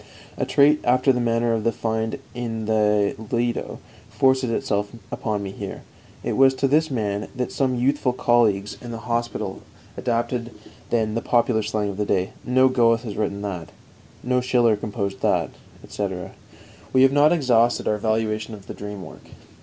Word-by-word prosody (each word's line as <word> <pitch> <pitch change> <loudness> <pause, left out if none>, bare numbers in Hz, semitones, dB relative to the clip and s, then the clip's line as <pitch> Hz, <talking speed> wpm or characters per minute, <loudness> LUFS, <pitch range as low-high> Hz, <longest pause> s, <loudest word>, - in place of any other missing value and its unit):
A - - -2
trait, 150 +2 +5
after 130 +2 +3
the 125 - -1
manner 115 0 +1
of 110 -1 -1
the 115 - +2
find 110 0 -2 0.2
in 115 -3 -4
the 105 -2 +2 0.2
Lido, 120 0 -1 0.3
forces 130 -1 +2
itself 105 -2 -1 0.2
upon 105 -2 -2
me 95 - -5
here. - - -7 0.4
It - - -1
was 135 0 +5
to 135 +1 +1
this 155 +4 +3
man 105 -5 -2
that 125 -1 -2
some 130 -2 0
youthful 130 +1 +1
colleagues 115 -5 +2
in 120 - -8
the 115 - -5
hospital 120 0 -2 0.3
adapted 120 0 -1
the 110 -2 -15 0.3
then 110 0 -4
popular 120 -2 +2
slang 105 -1 -1
of 100 - -6
that 105 -1 -1
day: 95 -1 0
"No 130 +1 +4
Goethe 115 -3 +3
has 110 -4 -6
written 100 -1 -2
that," 90 -5 -5 0.5
"No 125 0 +1
Schiller 120 -3 +3
composed 100 -2 -4
that," - - +1 0.3
etc. 95 -3 -4 0.6
We 130 0 +6
have 135 0 +5
not 145 +1 +5
exhausted 120 -7 +2
our 105 - +1
valuation 110 0 -1
of 100 -2 -14
the - - -7
dream 105 -2 -7
work. - - -14
115 Hz, 170 wpm, -23 LUFS, 105-125 Hz, 0.6 s, We